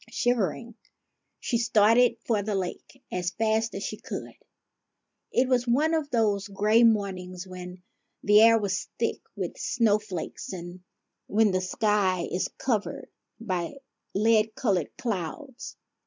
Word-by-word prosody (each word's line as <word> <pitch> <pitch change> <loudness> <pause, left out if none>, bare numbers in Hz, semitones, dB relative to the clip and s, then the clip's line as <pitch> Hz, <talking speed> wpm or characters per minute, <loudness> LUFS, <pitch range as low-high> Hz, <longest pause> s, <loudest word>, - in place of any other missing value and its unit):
Shivering, 235 -1 -1 0.7
she 235 - -1
started 230 +2 +4
for 220 -3 +1
the 205 0 -2
lake 195 +7 -5
as 180 -1 -1
fast 220 +3 0
as 195 - -4
she 215 - -4
could. - - -6 1.0
It 250 +1 +2
was 250 -1 +1
one 295 +7 +2
of 310 -3 0
those 215 -4 +1
gray 210 +3 +3
mornings 190 -5 +1
when 180 -1 -9 0.4
the 210 +1 +6
air 230 0 +7
was 200 -3 -2
thick - - -1
with - - -5
snowflakes 210 -7 -1
and 175 0 -8 0.5
when 215 0 +3
the 185 0 0
sky 185 -2 +1
is 180 - 0
covered 225 -5 -2 0.3
by 185 -2 -3 0.4
lead 220 +1 +3
colored 190 - 0
clouds. 230 - -5
210 Hz, 130 wpm, -27 LUFS, 185-230 Hz, 1.0 s, air